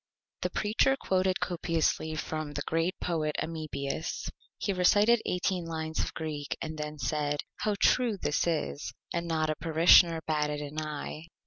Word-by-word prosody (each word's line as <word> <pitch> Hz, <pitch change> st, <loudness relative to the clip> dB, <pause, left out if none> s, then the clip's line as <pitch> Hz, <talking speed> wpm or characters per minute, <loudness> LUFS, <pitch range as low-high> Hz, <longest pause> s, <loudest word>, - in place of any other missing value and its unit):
The -, -, 0 dB
Preacher 220 Hz, +6 st, +2 dB
quoted 185 Hz, 0 st, +1 dB
copiously 165 Hz, -2 st, 0 dB
from 155 Hz, -1 st, -4 dB
the 145 Hz, 0 st, -3 dB
Great 165 Hz, +3 st, 0 dB
Poet 155 Hz, -3 st, -1 dB
Amebius. 155 Hz, -2 st, -3 dB, 0.3 s
He 200 Hz, -, -1 dB
recited 205 Hz, +5 st, +4 dB
18 180 Hz, -1 st, 0 dB
lines 160 Hz, -1 st, -3 dB
of -, -, -2 dB
Greek 150 Hz, -2 st, -4 dB
and 160 Hz, 0 st, -4 dB
then 150 Hz, 0 st, -5 dB
said: 145 Hz, -1 st, -1 dB, 0.2 s
"How 210 Hz, -1 st, 0 dB
true 240 Hz, -5 st, +3 dB
this 150 Hz, -2 st, 0 dB
is!" 110 Hz, -, -2 dB, 0.2 s
And 170 Hz, 0 st, -2 dB
not 155 Hz, -1 st, +1 dB
a -, -, -2 dB
Parishioner 165 Hz, +1 st, +5 dB
batted 150 Hz, -1 st, 0 dB
an 150 Hz, +1 st, -4 dB
Eye. 155 Hz, +1 st, -5 dB
160 Hz, 150 wpm, -29 LUFS, 150-180 Hz, 0.3 s, Parishioner